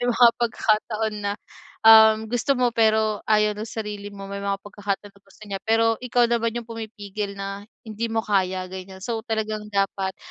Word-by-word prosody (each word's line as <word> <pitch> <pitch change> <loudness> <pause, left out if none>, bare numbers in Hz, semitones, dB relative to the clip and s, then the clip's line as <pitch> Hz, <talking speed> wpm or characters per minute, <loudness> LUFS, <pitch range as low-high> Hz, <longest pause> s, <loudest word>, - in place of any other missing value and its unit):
May 245 - 0
mga 245 0 +6
pagkakataon 220 -1 0
na, 200 0 -1 0.5
um, 220 0 +8
gusto 245 +3 +1
mo, 245 -1 +2
pero 220 -2 +2
ayaw 210 -1 +4
ng 215 +2 -6
sarili 210 -2 -5
mo. 200 -1 -10
May 200 0 -5
mga 200 0 -1
pagkakataon 205 0 -4
na 200 - -23
gusto 195 +2 -21
niya, 195 -2 -5
pero 225 0 +3
ikaw 245 -1 +2
naman 230 -1 0
'yong 235 -1 -5
pumipigil 210 -3 -6
na, 195 +1 -6 0.2
"Hindi 220 +1 -4
mo 225 0 -1
kaya." 190 -2 0
Ganyan. 190 0 -9
So 230 -2 -2
talagang 215 -1 -2
dapat, 195 -1 -1
215 Hz, 180 wpm, -24 LUFS, 200-225 Hz, 0.5 s, um